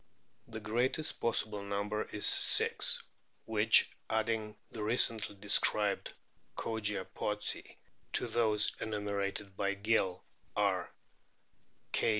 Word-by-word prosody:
The 110 - -6
greatest 120 +8 -1
possible 110 -3 -1
number 100 +1 -3
is 105 - -2
six, - - +5 0.4
which - - +4 0.2
adding 110 -1 -2 0.2
the 110 - -7
recently 110 -1 +2
described 105 0 +1 0.5
Kogia 105 -4 -2
pottsi 105 0 -3 0.4
to - - +3
those 110 -3 +1
enumerated 100 -2 -4
by 100 0 -1
Gill 100 -3 0 0.3
are 95 -3 0 1.0
K. - - +1
105 Hz, 100 wpm, -32 LUFS, 100-110 Hz, 1.0 s, six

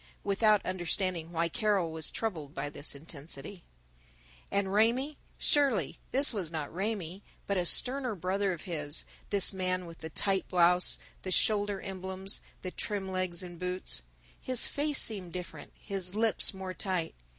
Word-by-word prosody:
Without 210 +1 +3
understanding 180 -2 -2
why 170 0 +1
Carol 200 -3 +1
was 160 -1 0
troubled 160 -11 -4
by 145 +1 -3
this 145 0 -2
intensity. 155 +3 -7 0.9
And 200 -1 0
Raymie 245 +8 +2 0.2
surely 265 - +1
this 275 0 +6
was 190 -7 -3
not 155 -3 -5
Raymie, 195 -1 -3 0.2
but 200 - -1
a 180 -2 +1
sterner 255 0 +4
brother 190 +2 0
of 175 - -6
his, 150 -4 0 0.2
this 200 0 +3
man 185 -1 -1
with 165 -1 -11
the 160 - -7
tight 195 +4 0
blouse, 180 0 +4 0.2
the 185 - -5
shoulder 205 +1 +2
emblems, 190 0 0 0.2
the 185 - -4
trim 195 -1 -4
legs 185 -2 -1
in 175 -2 -9
boots. 180 - 0 0.4
His 255 -2 +6
face 290 0 0
seemed 190 -6 -1
different, 170 -5 -7
his 195 -2 -3
lips 225 0 +2
more 190 -1 -6
tight. 185 -4 -2
185 Hz, 150 wpm, -31 LUFS, 170-205 Hz, 0.9 s, this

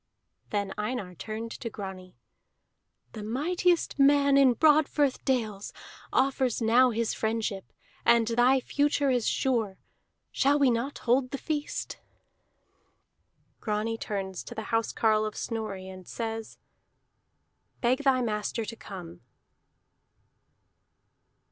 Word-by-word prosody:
Then 200 -2 -2
Einar 210 -4 -3
turned 220 +5 -6
to 230 - -5
Grani. 190 -4 -8 1.0
"The 220 - -7
mightiest 330 +11 0
man 280 0 +5
in 270 -2 +6
Broadfirth 295 -2 +3
dales 220 -6 -1 0.4
offers 260 -2 +1
now 240 +3 +5
his 230 -1 -1
friendship, 220 -3 -2 0.3
and 235 -1 +5
thy 245 +3 +4
future 285 0 +1
is 245 -3 +1
sure. 225 -7 0 0.5
Shall 280 +1 +3
we 275 -3 +4
not 240 +5 -2
hold 255 +2 +3
the 275 - -4
feast?" 300 0 -4 1.6
Grani 215 +1 -1
turns 190 -3 -4
to 240 - -8
the 220 -1 -6
housecarle 220 -1 +2
of 215 - -7
Snorri, 215 -5 -4
and 185 -1 -10
says: 225 -1 -5 1.2
"Beg 250 +1 +2
thy 260 -2 +3
master 215 0 -2
to 230 - -6
come!" 180 -6 -10
230 Hz, 110 wpm, -28 LUFS, 215-265 Hz, 1.6 s, in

